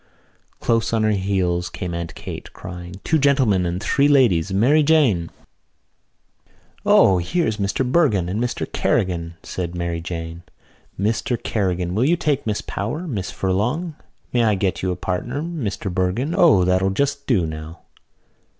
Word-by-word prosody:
Close 115 -1 +1
on 110 -1 +2
her 110 - +3
heels 95 -3 0
came 90 -1 -5
Aunt 85 -1 -5
Kate, - - -8
crying: 90 +1 -8
"Two 160 - +2
gentlemen 130 -10 +3
and 85 +1 -2
three 140 +1 +3
ladies, 105 - +3
Mary 125 +11 +4
Jane!" 140 - +3 1.5
"O, 95 -2 +5
here's 110 - 0
Mr 100 +5 -1
Bergin 125 - +2
and 100 +5 -2
Mr 125 - -2
Kerrigan," 85 -2 0
said 90 -1 -4
Mary 85 -1 -2
Jane. 85 -1 -6 0.6
"Mr 110 +4 0
Kerrigan, 90 -4 -1
will 110 +5 +1
you 170 +4 +3
take 150 -7 -1
Miss 105 -1 -1
Power? 135 - -4
Miss 100 - -3
Furlong, 125 - -1 0.4
may 120 -1 +3
I 110 -2 +3
get 95 -1 -1
you 95 - -1
a 90 - -1
partner, 105 - -3
Mr 115 - -4
Bergin. 95 - 0
O, 160 - +5
that'll 95 +1 +2
just 140 +7 -1
do 100 -10 +2
now." 80 +1 -7
100 Hz, 150 wpm, -21 LUFS, 90-130 Hz, 1.5 s, O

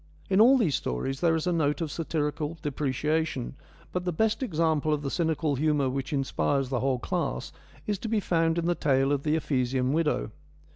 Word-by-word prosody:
In 190 +2 +5
all 260 +4 +7
these 190 - +2
stories 135 - -2
there 165 -2 +3
is 160 - -1
a 180 - +1
note 150 -3 +1
of 160 -3 -3
satirical 150 -1 -2
depreciation, 145 -1 -1 0.4
but 180 - -2
the 180 - -1
best 220 - +1
example 160 - +1
of 145 - -7
the 135 - -2
cynical 160 -4 0
humour 145 -2 +1
which 135 0 -3
inspires 135 -1 0
the 130 -2 0
whole 130 0 +1
class 60 - -3 0.3
is 205 -2 -1
to 225 - -5
be 220 -1 +1
found 165 -3 +1
in 170 - 0
the 175 - +2
tale 135 -4 +2
of 145 -1 +1
the 150 +1 +1
Ephesian 130 -3 0
Widow. 150 - 0
150 Hz, 195 wpm, -27 LUFS, 135-165 Hz, 0.4 s, all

